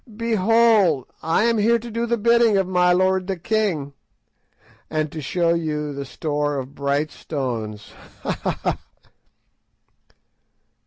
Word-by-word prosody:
Behold, 220 - +3 0.2
I 165 +6 +1
am 230 -1 +2
here 230 +3 +4
to 235 +1 -9
do 230 +2 -2
the 235 0 +1
bidding 235 -1 +4
of 190 -1 +1
my 180 -1 +3
lord 185 +1 +2
the 195 -2 -2
king, 170 -7 -1 1.0
and 155 -1 -1
to 160 - -6
show 170 +4 +1
you 150 -3 -2
the 140 0 -5
store 145 +1 -2
of 135 +1 -6
bright 140 +2 -1
stones. 115 -8 -5 0.3
_Ha! - - -1
ha! - - -3
ha! - - -1
175 Hz, 140 wpm, -22 LUFS, 145-220 Hz, 1.0 s, here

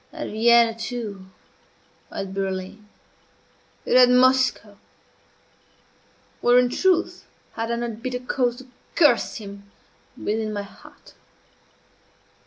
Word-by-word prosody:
At - - -6
Vienna, 230 +1 +4
too 225 -4 -6 0.8
at 195 -1 -6
Berlin 195 +2 -5 1.0
and - - +1
at 250 -1 +7
Moscow! 255 -4 +2 1.6
Where, 245 +1 +4
in 250 0 +4
truth, 360 +6 0 0.3
had 225 0 -4
I 235 - 0
not 235 -2 -5
bitter 250 0 -3
cause 250 -1 -1
to 260 +1 -13 0.3
curse 290 -8 +3
him 200 -2 -10 0.5
within 215 0 -2
my 205 -1 -3
heart? 200 - -17
230 Hz, 105 wpm, -23 LUFS, 205-250 Hz, 1.6 s, at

